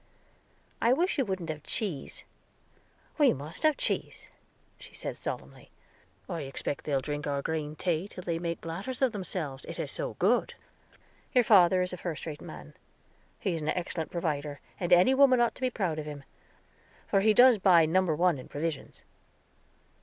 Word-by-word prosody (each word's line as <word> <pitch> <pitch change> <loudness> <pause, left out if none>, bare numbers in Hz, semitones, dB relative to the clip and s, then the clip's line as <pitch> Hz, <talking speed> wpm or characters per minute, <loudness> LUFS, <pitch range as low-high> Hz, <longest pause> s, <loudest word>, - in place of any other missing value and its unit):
"I 235 +2 +4
wish 340 +3 +1
you 270 - +2
wouldn't 190 -5 -4
have 155 -1 -7
cheese." 175 -4 -3 1.0
"We 285 -4 +6
must 145 +4 -8
have 310 -2 +3
cheese," - - -2 0.5
she - - -13
said - - -4
solemnly. - - -7 0.6
"I 170 -4 -4
expect 135 +1 -4
they'll 140 -3 0
drink 145 +2 -4
our 140 -1 -1
green 155 -1 -3
tea 175 +2 -1
till 185 -3 -9
they 170 -1 -2
make 170 -1 -3
bladders 195 +11 -4
of 260 - +4
themselves, 175 - -4
it - - -7
is - - -3
so - - -4
good. - - +1 0.8
Your 250 - +6
father 185 -4 +5
is 180 - -4
a - - -4
first 165 -5 -5
rate 150 -3 -6
man; 75 -1 -10 0.7
he 190 - -1
is 165 - -3
an 150 - -2
excellent 170 -2 -2
provider, 150 -4 -3 0.2
and 175 -1 -2
any 180 +9 +6
woman 265 -2 +5
ought 240 -1 +3
to - - -16
be 255 - +2
proud 185 -10 -2
of 150 - -6
him, 145 -2 -7 0.8
for 195 - +2
he 215 +2 +4
does 245 -2 +7
buy 180 -4 +6
number 170 0 +2
one 170 -2 +2
in - - -10
provisions." 155 0 -5
170 Hz, 175 wpm, -29 LUFS, 150-200 Hz, 1.0 s, does